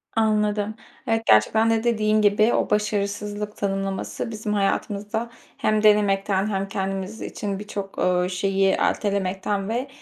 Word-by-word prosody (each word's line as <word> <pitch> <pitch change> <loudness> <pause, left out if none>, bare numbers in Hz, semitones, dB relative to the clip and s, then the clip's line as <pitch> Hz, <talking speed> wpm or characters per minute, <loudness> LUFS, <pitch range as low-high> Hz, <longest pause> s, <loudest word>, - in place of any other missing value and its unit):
Anladım. 210 -1 +1 0.3
Evet, 225 0 0
gerçekten 220 - +4
de 225 0 +1
dediğin 215 -2 +2
gibi 210 +2 +4
o - - +1
başarısızlık 210 0 -2
tanımlaması 195 +3 -3
bizim 215 -1 -3
hayatımızda 205 +3 -1 0.3
hem 215 0 +1
denemekten 200 -1 +3
hem 195 -1 -2
kendimiz 195 +2 -4
için 200 -2 -4
birçok, 200 -2 -6
ııı, 180 0 +1
şeyi 195 +1 +1
ertelemekten 195 0 -1
ve, 245 +4 -2
205 Hz, 125 wpm, -23 LUFS, 195-215 Hz, 0.3 s, gerçekten